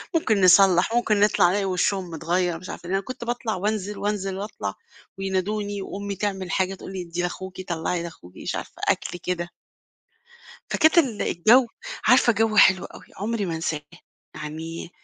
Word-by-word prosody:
ممكن 220 -10 +2
نصلّح، 185 +2 +6
ممكن 220 -3 +2
نطلع 205 -4 +4
نلاقي 200 +1 0
وشّهم 185 0 0
متغيّر 175 +1 0
مش 185 - -10
عارفة، 175 - -8
أنا 195 +1 +1
كنت 255 +4 -7
باطلع 235 -2 -2
وأنزل، 205 +1 -2
وأنزل 195 -1 -2
وأطلع، 205 +2 -4 0.4
وينادوني، 200 +1 -2
وأمي 200 +1 -5
تعمل 190 -3 -3
حاجة 190 0 0
تقول 190 - -9
لي 185 - -4
ادّي 175 0 -4
لأخوكِ 185 +1 -5
طلّعي 170 0 -2
لأخوكِ، 125 - -10
مش - - -4
عارفة - - -7
أكل 175 - -1
كده. 175 -1 -3 1.2
فكانت 315 +2 +4
ال 250 -10 +2
الجو 235 +9 +4 0.4
عارفة 240 +1 +6
جو 220 0 +1
حلو 190 -3 +6
أوي - - -11
عمري 210 0 -2
ما 165 - -2
أنساه، 160 -2 -2 0.5
يعني 160 +3 -6
190 Hz, 160 wpm, -24 LUFS, 175-210 Hz, 1.2 s, نصلّح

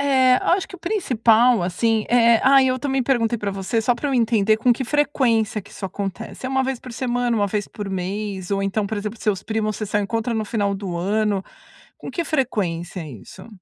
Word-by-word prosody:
É, 260 -2 +4
acho 370 +1 +1
que - - -12
o - - -19
principal, 245 - +3
assim, 215 +5 0
é 235 -1 +5
ai, 270 0 +6
eu 255 0 +1
também 270 -1 0
perguntei 240 -3 +1
pra 205 -1 -2
você 195 +4 -1
só 240 +2 +2
pra 285 +5 -3
eu 275 - 0
entender 220 -3 +3
com 245 +2 +3
que 255 +2 -3
frequência 235 -7 +1
que - - -17
isso - - -8
acontece. 195 +5 -6
É - - -2
1 265 0 +1
vez 260 -2 -3
por 250 - -10
semana, 245 -1 -1
1 205 - +2
vez 205 0 -2
por 205 -2 -6
mês, 190 0 -4
ou 195 0 0
então, 200 +1 -1
por 220 - -3
exemplo, 210 +2 -5
seus 200 -3 0
primos, 215 -2 -1
vocês 215 -2 -5
só 210 - +2
encontram 225 +3 -2
no 220 -1 -1
final 205 -2 -1
do 190 -3 -5
ano. 200 +2 0 0.5
Com - - -8
que 340 - -2
frequência 190 - -2
é 155 - -8
isso? 115 - -12
220 Hz, 220 wpm, -22 LUFS, 200-250 Hz, 0.5 s, ai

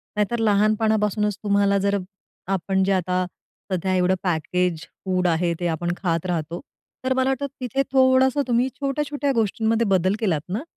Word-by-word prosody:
नाहीतर 210 +3 0
लहानपणापासूनच, 210 -1 +2
तुम्हाला 200 -1 +3
जर 200 +1 +1 0.6
आपण 190 +1 0
जे 195 - +1
आता 185 0 0 0.5
सध्या 185 +1 0
एवढं 185 +1 +3
पॅकेज 175 0 0 0.2
फूड 185 -1 +1
आहे, 170 +1 +1
ते 175 - -1
आपण 175 +1 -1
खात 170 -2 -1
राहतो, 170 -1 -2 0.5
तर 260 - +2
मला 260 0 +1
वाटतं, 270 +1 -1 0.2
तिथे 260 +2 0
थोडंसं 260 +1 +4
तुम्ही 245 +1 +2
छोट्या-छोट्या 285 0 -1
गोष्टींमध्ये 225 +1 +1
बदल 190 +1 +2
केलात 175 -10 0
ना, 220 +10 -2
200 Hz, 150 wpm, -23 LUFS, 180-235 Hz, 0.6 s, थोडंसं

